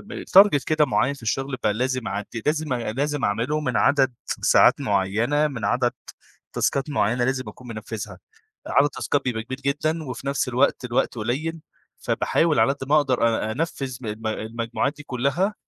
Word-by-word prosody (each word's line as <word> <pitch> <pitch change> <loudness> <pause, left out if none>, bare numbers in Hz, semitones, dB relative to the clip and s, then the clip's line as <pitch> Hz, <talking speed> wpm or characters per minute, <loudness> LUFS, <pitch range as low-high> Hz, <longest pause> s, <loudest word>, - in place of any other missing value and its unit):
م - - -8
target 195 -7 +6
كده 155 -1 +3
معيّن 135 +1 +1
في 140 - -15
الشغل 135 +4 -2
بقى 105 - +2
لازم 130 +2 -2
أعد 100 +2 -3 0.2
لازم 150 -1 0
أ 120 -3 -2
لازم 145 +3 -1
أعمله 115 +9 0
من 125 -5 -1
عدد 135 -3 +3
ساعات - - +4
معيّنة، 110 +10 +1
من 130 -6 -6
عدد 125 -1 +1 0.6
تاسكات 140 +2 0
معيّنة 120 -3 +1
لازم 130 0 -1
أكون 125 - -12
منفِّذها، 110 -2 -6 0.5
عدد 140 +1 +3
تاسكات 145 -1 -1
كبير 115 -4 -3
جدًا 140 +4 -1
وفي 130 0 -7
نفس 140 -1 0
الوقت 125 +1 +1
الوقت 125 0 0
قليّل، 150 +9 -2 0.4
فباحاول 165 -2 +1
على 135 - +4
قد 135 -1 -8
ما 150 - +4
أقدر 130 -5 +2
أ 110 -1 -1
أنفِّذ 135 -2 -3
م 125 - -8
الم 110 +1 -5
المجموعات 115 +5 -2
دي 145 - -10
كلّها 145 - -1
130 Hz, 170 wpm, -24 LUFS, 115-145 Hz, 0.6 s, target